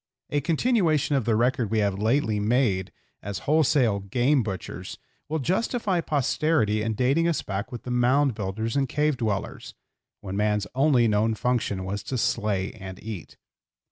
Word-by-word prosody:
A 145 - +1
continuation 160 - +2
of 130 -5 0
the 115 - +2
record 120 -1 +1
we 110 - 0
have 100 -2 +1
lately 110 -1 +1
made 105 -4 +1 0.3
as 100 -1 -5
wholesale 140 -8 +3
game 125 +8 +1
butchers 95 -6 -6 0.3
will 160 - 0
justify 190 - 0
posterity 145 -6 +1
in 110 0 -1
dating 135 +8 +2
us 170 - 0
back 100 +1 -4
with 120 - -7
the 125 - -5
mound 130 +3 +3
builders 110 +2 -3
and 135 -2 +1
cave 150 +1 +1
dwellers, 110 -5 -3 0.4
when 95 -1 -6
man's 105 0 +1
only 130 -3 +3
known 110 +1 +2
function 110 -5 -1
was 100 +2 -3
to 130 +6 -4
slay 105 -4 0
and 95 -3 -9
eat. 105 -7 -7
115 Hz, 160 wpm, -25 LUFS, 105-145 Hz, 0.4 s, wholesale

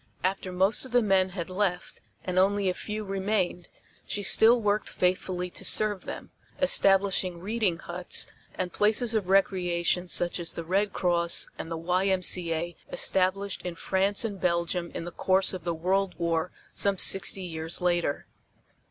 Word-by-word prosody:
After 185 0 -1
most 190 +4 +2
of 260 - -7
the 245 -1 +4
men 190 -2 +2
had 180 -3 -5
left 185 -1 -3 0.2
and 185 0 0
only 200 +1 +2
a 185 - +1
few 215 +3 -5
remained 195 -2 -2 0.4
she 205 - -4
still 225 +5 +6
worked 210 -1 0
faithfully 180 0 -1
to - - -6
serve 210 -3 +3
them, - - -8 0.3
establishing 195 -8 +3
"reading 205 -2 -1
huts" 175 +1 -4 0.3
and 180 -1 -3
places 220 +3 +2
of 205 -5 -1
recreation 180 -2 +1
such 175 +1 +1
as 170 -1 -2
the 170 - -6
Red 195 +4 0
Cross 170 -2 +1
and - - -5
the 165 - -4
Y.M.C.A. 180 -1 0 0.2
established 195 - +1
in 180 -1 -5
France 195 +5 +1
and 200 -4 -5
Belgium 170 0 0
in 165 - -4
the 175 - -6
course 190 +3 +2
of 180 -3 -7
the 170 -1 -1
World 185 +3 0
War 170 0 -1 0.2
some 200 -1 +2
sixty 195 +1 +2
years 165 -1 -3
later. 175 -5 0
185 Hz, 160 wpm, -27 LUFS, 175-200 Hz, 0.4 s, still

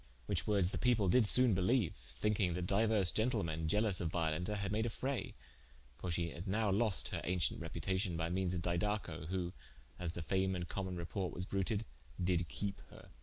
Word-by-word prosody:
Whiche - - -1
woordes 100 -4 +2
the - - -3
people 115 -6 +3
did 120 +1 +4
sone 125 0 +6
beleue, 95 +2 +2 0.3
thinking 100 -5 +1
that 90 -1 -2
diuers 100 -1 +3
gentlemen 100 -9 0
ielous 105 +1 +1
of 80 -3 -1
Violenta 85 +4 -1
had 100 0 -2
made 110 +2 +1
a - - -1
fraye: 130 +4 -3 0.6
for 90 - -4
she 85 -1 0
had 85 +5 -7
now 105 +1 +1
loste 105 0 +4
her - - -3
auncient 90 -2 +1
reputacion 85 +3 -1
by 80 0 -1
meanes 90 +1 -1
of 85 - -3
Didaco, 85 -3 -1
who 90 0 -2 0.5
(as 85 -2 -3
the 85 - -5
fame 95 +2 +1
and 90 -1 -4
common 95 -2 -4
reporte 90 +2 -3
was 90 - -2
bruted) 100 +3 -1 0.3
did 90 -1 +1
keepe 100 -1 -4
her. - - -14
95 Hz, 190 wpm, -36 LUFS, 85-105 Hz, 0.6 s, sone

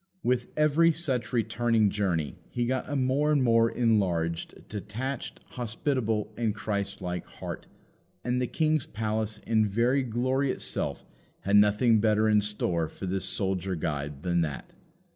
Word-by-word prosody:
With 125 0 +1
every 155 +2 +4
such 135 -7 -2
returning 115 -2 +2
journey 90 -8 -1
he 120 -1 -1
got 130 +1 -1
a 145 - -2
more 135 +3 +2
and 145 -3 +3
more 115 -1 +4
enlarged, 90 -9 0
detached, 110 +6 -5
hospitable, 115 -3 -2
and 115 -3 -1
Christ 100 -1 -3
like 90 0 -3
heart, - - -7 0.6
and 125 +1 0
the 125 - 0
King's 155 -1 +1
palace 110 0 -2
in 110 -1 +3
very 120 +7 +2
glory 130 +3 0
itself - - -3 0.4
had 100 +1 +3
nothing 105 +3 +5
better 110 0 +3
in 105 -1 +4
store 90 -6 0
for 95 - -8
this 95 +1 -1
soldier 95 -2 -1
guide 75 -2 -3
than 85 -1 +1
that. 75 -4 -4
110 Hz, 145 wpm, -28 LUFS, 100-125 Hz, 0.6 s, nothing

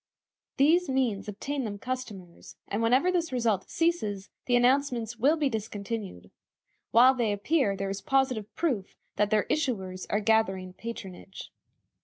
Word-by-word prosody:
These 325 +5 +4
means 250 -7 0
obtain 270 +7 -4
them 205 -3 -4
customers, 205 -8 -7
and 205 - -2
whenever 255 +10 +3
this 340 -4 -1
result 230 -6 0
ceases 215 - -1 0.2
the 245 - +3
announcements 245 -2 +2
will 285 +8 +3
be 300 -2 +1
discontinued. 210 - -5 0.6
While 250 +4 +6
they 235 -5 0
appear 205 +1 +1
there 195 0 -2
is 195 - -5
positive 265 -7 0
proof 250 - -2 0.2
that 210 -1 +2
their 215 -1 +3
issuers 195 -11 -2
are 205 - +1
gathering 195 -4 +1
patronage. 195 -4 -8
230 Hz, 140 wpm, -28 LUFS, 200-265 Hz, 0.6 s, While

